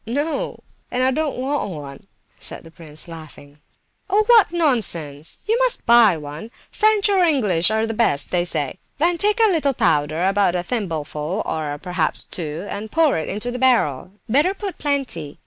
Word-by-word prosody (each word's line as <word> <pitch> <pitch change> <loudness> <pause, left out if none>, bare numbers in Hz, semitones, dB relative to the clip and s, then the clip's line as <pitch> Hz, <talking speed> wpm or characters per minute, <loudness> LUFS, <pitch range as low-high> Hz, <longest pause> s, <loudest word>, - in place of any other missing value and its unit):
"No—and 255 -1 -4
I 260 - +3
don't 300 0 -2
want 270 -2 -2
one," 145 -5 -8 0.4
said - - -4
the 165 - -14
prince, 160 -2 -9
laughing. 155 -3 -12 0.5
"Oh, 410 +3 +3
what 460 -6 +5
nonsense! 175 - 0
You 450 +3 +1
must - - +1
buy 235 -7 +6
one. 150 +7 -8 0.2
French 430 -1 +3
or 395 -2 +2
English 210 - +3
are 220 0 +1
the 225 - -3
best, 215 -11 +1
they 175 -1 +1
say. 170 0 -3 0.2
Then 340 +3 +1
take 420 +2 +2
a - - +5
little 290 -6 +1
powder, 155 +1 +1
about 195 -2 +2
a 175 - -1
thimbleful, 170 - -3
or 150 -2 -3
perhaps 180 +1 -1
two, 160 +1 -4
and 210 +2 -6
pour 320 -3 +3
it 155 - -5
into 215 +5 -2
the 250 - -5
barrel. 220 - +2 0.2
Better 295 - +2
put 400 -2 -6
plenty. 265 - -2
215 Hz, 170 wpm, -21 LUFS, -, 0.5 s, buy